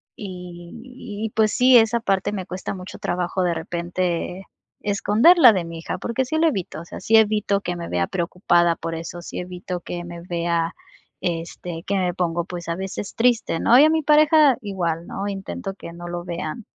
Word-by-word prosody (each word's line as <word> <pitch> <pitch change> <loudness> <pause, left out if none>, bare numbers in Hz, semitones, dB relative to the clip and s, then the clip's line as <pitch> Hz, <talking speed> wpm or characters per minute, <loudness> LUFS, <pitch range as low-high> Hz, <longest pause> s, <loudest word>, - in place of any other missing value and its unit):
y 205 +5 -9
y, - - -8
pues, 215 -1 +2
sí, 250 0 +6
esa 225 +1 +4
parte 195 -3 0
me 190 -3 -4
cuesta 185 +3 -5
mucho 185 0 -9
trabajo 180 +1 -1
de 175 -1 +1
repente 175 +2 -3 0.4
esconderla 225 - +6
de 180 -3 -1
mi 165 -1 -7
hija, - - -4
porque 255 +3 -2
sí 315 +5 -2
lo 325 +1 +4
evito, 185 - -3
o - - -11
sea, - - -9
sí 225 - +3
evito 210 -2 +2
que 175 -2 -3
me 170 -1 -6
vea 90 0 +1
preocupada 175 -1 +1
por 165 - -5
eso, 165 +1 -6
sí - - -6
evito 180 0 -5
que 175 0 -6
me 170 0 -8
vea, 170 0 -1 0.5
este, 165 0 -4
que 200 - 0
me 180 -2 0
pongo, 170 -1 -1
pues, 175 -2 -7
a 170 - 0
veces 190 +1 -5
triste, 230 -7 +2
¿no?, 245 +3 +6
y - - +8
a - - +5
mi 315 -1 +1
pareja 300 -3 +5
igual, 175 -5 -3
¿no?, 200 +1 -4
intento 195 0 -5
que 170 - -9
no 175 0 -8
lo 175 0 -4
vean. 170 +4 -5
185 Hz, 195 wpm, -22 LUFS, 170-220 Hz, 0.5 s, y